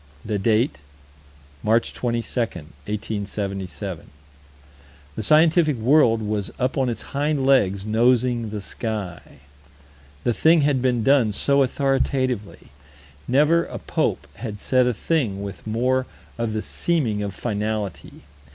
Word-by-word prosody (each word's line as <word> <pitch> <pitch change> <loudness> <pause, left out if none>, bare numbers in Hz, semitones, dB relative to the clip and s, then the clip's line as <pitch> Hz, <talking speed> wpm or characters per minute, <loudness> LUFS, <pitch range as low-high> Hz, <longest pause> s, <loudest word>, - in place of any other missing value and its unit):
The 105 -2 -1
date: 115 - +1 0.8
March 115 +2 +1
22, 120 -1 -2
1877. 100 - -4 1.0
The - - -4
scientific 155 - +4
world 115 -2 +4
was 105 -1 -2
up 130 0 0
on 135 -3 +1
its 115 - -4
hind 145 -1 0
legs 100 -8 +3
nosing 120 +1 +2
the 105 -1 -5
sky. 100 -5 -5 1.0
The 120 - +1
thing 160 +6 +4
had 140 -3 +2
been 125 -3 +1
done 135 -5 +4
so 140 +6 +2
authoritatively. 130 -4 -1 0.6
Never 150 +6 +3
a - - -7
pope - - -1
had 105 -4 -6
said 130 +3 +2
a 125 - +1
thing 110 -10 -1
with 100 +1 -8
more 125 +4 +1 0.3
of 115 -2 -2
the 110 - -2
seeming 130 -12 -1
of 100 -2 -4
finality. 105 -3 -4
115 Hz, 125 wpm, -23 LUFS, 105-135 Hz, 1.0 s, scientific